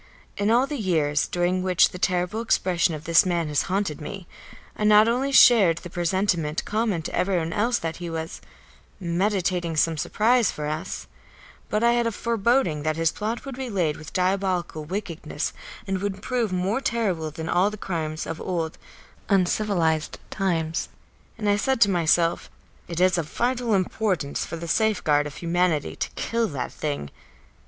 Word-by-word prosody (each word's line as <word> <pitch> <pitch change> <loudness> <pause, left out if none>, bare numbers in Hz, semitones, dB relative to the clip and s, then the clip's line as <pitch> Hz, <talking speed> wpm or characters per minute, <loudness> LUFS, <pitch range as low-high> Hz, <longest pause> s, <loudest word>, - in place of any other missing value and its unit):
In 205 +1 0
all 240 +3 +4
the 290 -1 -5
years 155 -7 +1
during 180 +1 0
which 185 -2 +4
the 180 - -9
terrible 180 +4 0
expression 180 -6 +1
of 150 - -8
this 165 0 +5
man 170 -4 -1
has 145 -1 +2
haunted 185 -5 -1
me, 190 +4 -7 0.5
I - - -4
not 210 +1 +6
only 255 +4 +1
shared 215 -11 +7
the 175 0 -9
presentiment 175 -3 0
common 210 -6 -1
to - - -6
everyone 175 -4 0
else 235 +4 +1
that 165 -1 -4
he 175 -1 -6
was 160 0 -5 0.6
"meditating 180 -2 0
some 160 +1 +2
surprise 230 +7 +2
for 150 - -4
us," 155 +5 -4 0.6
but 210 +2 0
I 235 - +5
had 240 -1 +2
a - - 0
foreboding 230 - +1
that 155 +1 -1
his 165 0 +1
plot 220 +4 -4
would 270 -2 -6
be 260 -1 -5
laid 175 -8 0
with 155 - -10
diabolical 185 -4 -1
wickedness 175 -1 -4 0.3
and 190 -2 -2
would 200 -1 -4
prove 240 -5 -1
more 185 +7 0
terrible 200 -11 -1
than 160 +1 -7
all 180 +4 +3
the 210 - -8
crimes 160 -5 -3
of 160 - -5
old, 165 -3 -3 0.5
uncivilised 180 -5 +1
times. 165 -5 -1 0.5
And 210 - -3
I 205 0 +3
said 265 +4 0
to 200 -3 +6
myself: 170 -1 +2 0.4
"It 170 -1 -4
is 180 -1 +3
of 155 -2 -4
vital 240 -2 0
importance 185 -5 -1
for - - -5
the 170 +1 -6
safeguard 160 -7 +2
of 145 - -10
humanity 170 -2 0
to - - -3
kill 230 0 0
that 140 -8 -4
thing." 145 - -4
180 Hz, 170 wpm, -24 LUFS, 165-210 Hz, 0.6 s, shared